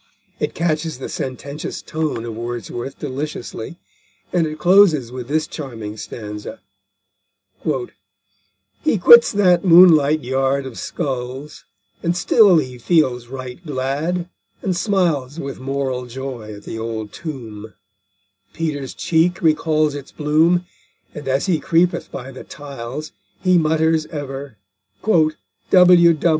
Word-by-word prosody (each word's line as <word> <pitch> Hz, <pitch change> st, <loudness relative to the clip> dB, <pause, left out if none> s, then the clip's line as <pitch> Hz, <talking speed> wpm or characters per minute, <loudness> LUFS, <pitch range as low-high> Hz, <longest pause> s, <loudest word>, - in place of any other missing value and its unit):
It -, -, -2 dB
catches 160 Hz, -3 st, -1 dB
the 130 Hz, -, -6 dB
sententious 140 Hz, +3 st, -5 dB
tone 155 Hz, -7 st, -3 dB
of 115 Hz, -, -5 dB
Wordsworth 120 Hz, +2 st, -5 dB
deliciously, 145 Hz, -1 st, -5 dB, 0.6 s
and 170 Hz, -3 st, +2 dB
it 155 Hz, 0 st, -6 dB
closes 165 Hz, -, +4 dB
with 125 Hz, -1 st, -6 dB
this 155 Hz, +2 st, 0 dB
charming 115 Hz, -10 st, -7 dB
stanza: 105 Hz, -, -7 dB, 1.0 s
_He 370 Hz, -, -5 dB
quits 475 Hz, 0 st, +8 dB
that 185 Hz, -4 st, +3 dB
moonlight 165 Hz, -4 st, +6 dB
yard 135 Hz, +2 st, 0 dB
of 130 Hz, -3 st, -8 dB
skulls, 135 Hz, -1 st, -5 dB, 0.4 s
And 170 Hz, +1 st, 0 dB
still 195 Hz, 0 st, +5 dB
he 130 Hz, -5 st, -2 dB
feels 125 Hz, -5 st, +1 dB
right 130 Hz, +4 st, -8 dB
glad, 150 Hz, +5 st, -2 dB, 0.4 s
and 185 Hz, -2 st, 0 dB
smiles 170 Hz, -, 0 dB
With 140 Hz, -2 st, -6 dB
moral 130 Hz, -1 st, -3 dB
joy 125 Hz, -3 st, -7 dB
at 100 Hz, -, -13 dB
that -, -, -6 dB
old 110 Hz, -2 st, -5 dB
tomb; 115 Hz, -9 st, -8 dB, 0.8 s
Peter's 145 Hz, -5 st, -3 dB
cheek 170 Hz, +2 st, +1 dB
recalls 155 Hz, -1 st, +2 dB
its 140 Hz, -1 st, -8 dB
bloom, 160 Hz, +4 st, +2 dB, 0.5 s
And 150 Hz, -4 st, -8 dB
as 135 Hz, +3 st, +1 dB
he 180 Hz, -5 st, +1 dB
creepeth 170 Hz, +4 st, +1 dB
by 130 Hz, +2 st, -7 dB
the 130 Hz, -, -10 dB
tiles, 140 Hz, 0 st, -7 dB, 0.3 s
He 185 Hz, -2 st, +4 dB
mutters 160 Hz, 0 st, +1 dB
ever 140 Hz, -5 st, -7 dB, 0.5 s
"W.W. 170 Hz, 0 st, +4 dB
150 Hz, 120 wpm, -20 LUFS, 130-165 Hz, 1.0 s, quits